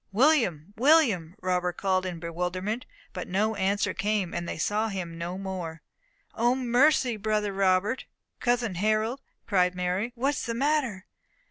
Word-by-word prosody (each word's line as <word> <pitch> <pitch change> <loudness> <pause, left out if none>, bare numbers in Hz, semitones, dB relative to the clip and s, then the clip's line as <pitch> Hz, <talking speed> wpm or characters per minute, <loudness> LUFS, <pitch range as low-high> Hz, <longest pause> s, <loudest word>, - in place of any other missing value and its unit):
"William! 205 - +2
William!" 230 - +4
Robert 180 -1 0
called 185 -1 +1
in 175 -2 -5
bewilderment; 180 +7 -3 0.3
but 180 -3 -5
no 210 +4 +1
answer 200 +1 0
came, 205 -3 -1
and 170 0 -3
they - - -4
saw 210 +7 0
him 185 -5 -5
no 170 +2 -4
more. 180 -5 -5 0.5
"O 240 +2 +2
mercy! 255 -1 +3
Brother 210 -1 0
Robert! 195 +4 +1 0.3
cousin 240 -4 +1
Harold!" 215 +7 0 0.2
cried 180 -3 +2
Mary, 180 +6 -1
"what 270 +4 +1
is 260 - -3
the 230 - -2
matter?" 260 -7 0
200 Hz, 145 wpm, -27 LUFS, 180-235 Hz, 0.5 s, William